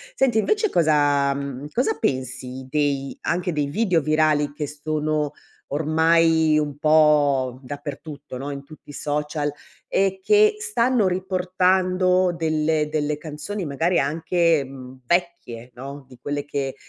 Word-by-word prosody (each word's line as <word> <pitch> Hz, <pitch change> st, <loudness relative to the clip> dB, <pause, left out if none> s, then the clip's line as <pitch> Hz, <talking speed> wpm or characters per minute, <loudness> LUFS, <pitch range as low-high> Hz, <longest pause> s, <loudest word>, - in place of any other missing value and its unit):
Senti 245 Hz, -, +2 dB
invece 430 Hz, -, +1 dB
cosa, 145 Hz, -, +3 dB
mhmm, 140 Hz, 0 st, -5 dB
cosa 255 Hz, -, 0 dB
pensi 130 Hz, -, -3 dB
dei 140 Hz, -1 st, -1 dB
anche 180 Hz, +1 st, -1 dB
dei 150 Hz, -2 st, 0 dB
video 180 Hz, +1 st, +1 dB
virali 155 Hz, -1 st, +2 dB
che 150 Hz, 0 st, -4 dB
sono 150 Hz, 0 st, -2 dB, 0.4 s
ormai 160 Hz, +1 st, +3 dB
un 145 Hz, -2 st, -2 dB
po' 145 Hz, -5 st, +3 dB
dappertutto 145 Hz, 0 st, -8 dB
no, 140 Hz, +2 st, -5 dB
in 140 Hz, -1 st, -6 dB
tutti 155 Hz, +1 st, -16 dB
i -, -, -9 dB
social 150 Hz, +1 st, -2 dB, 0.4 s
e 190 Hz, 0 st, +1 dB
che 425 Hz, 0 st, +5 dB
stanno 255 Hz, -, +1 dB
riportando 185 Hz, 0 st, +1 dB
delle 155 Hz, -2 st, 0 dB
delle 150 Hz, -1 st, -1 dB
canzoni 155 Hz, +6 st, -6 dB
magari 160 Hz, +5 st, +1 dB
anche, 165 Hz, +2 st, +1 dB
mhmm, 130 Hz, -1 st, -11 dB
vecchie, 170 Hz, -8 st, -2 dB
no, 140 Hz, +3 st, -8 dB
di 125 Hz, -, -14 dB
quelle 145 Hz, +2 st, -3 dB
che 140 Hz, -2 st, -3 dB
150 Hz, 130 wpm, -23 LUFS, 140-175 Hz, 0.4 s, che